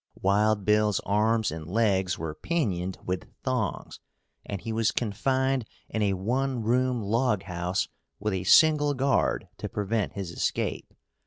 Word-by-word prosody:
Wild 105 +1 +2
Bill's 105 -1 +3
arms 110 +1 +1
and 80 -1 -7
legs 95 -4 +1
were 80 -1 -4
pinioned 95 - -2
with 90 0 -3
thongs - - -2 0.4
and 100 - -5
he 110 +4 -5
was 110 -1 +2
confined 130 +4 0 0.3
in 110 - -2
a 100 -2 +2
one 125 +6 -1
room 125 +1 +1
log 110 -1 +1
house 90 0 -2 0.3
with 105 0 -2
a 95 0 -2
single 150 - +5
guard 135 +1 +1
to - - -4
prevent 105 0 -1
his 95 -4 -5
escape. - - -2
105 Hz, 145 wpm, -27 LUFS, 95-125 Hz, 0.4 s, single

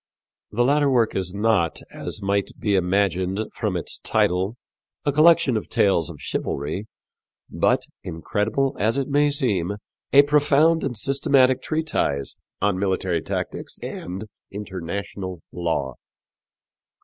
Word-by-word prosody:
The 120 +3 +1
latter 145 +2 +3
work 120 -4 +2
is 90 -2 -1
not, 100 -4 +1
as 105 - -5
might 100 0 +1
be 105 - 0
imagined 95 0 +1
from - - -1
its - - -5
title, 95 +5 +1 0.5
a 145 - +3
collection 155 -3 +5
of 110 - -3
tales 90 -5 +2
of 80 -4 -9
chivalry, 80 +9 -3 0.6
but, - - +2 0.2
incredible 105 +11 -1
as 110 +5 +2
it 135 - 0
may 145 +1 +3
seem, 105 - 0 0.4
a 140 +1 +8
profound 150 +3 +3
and 125 -4 -2
systematic 135 +1 +3
treatise 155 - -1 0.3
on 100 -2 +2
military 95 -3 0
tactics - - -4
and 95 +4 -5 0.3
international 95 -1 -5
law. 80 -6 -2
105 Hz, 125 wpm, -23 LUFS, 90-135 Hz, 0.6 s, a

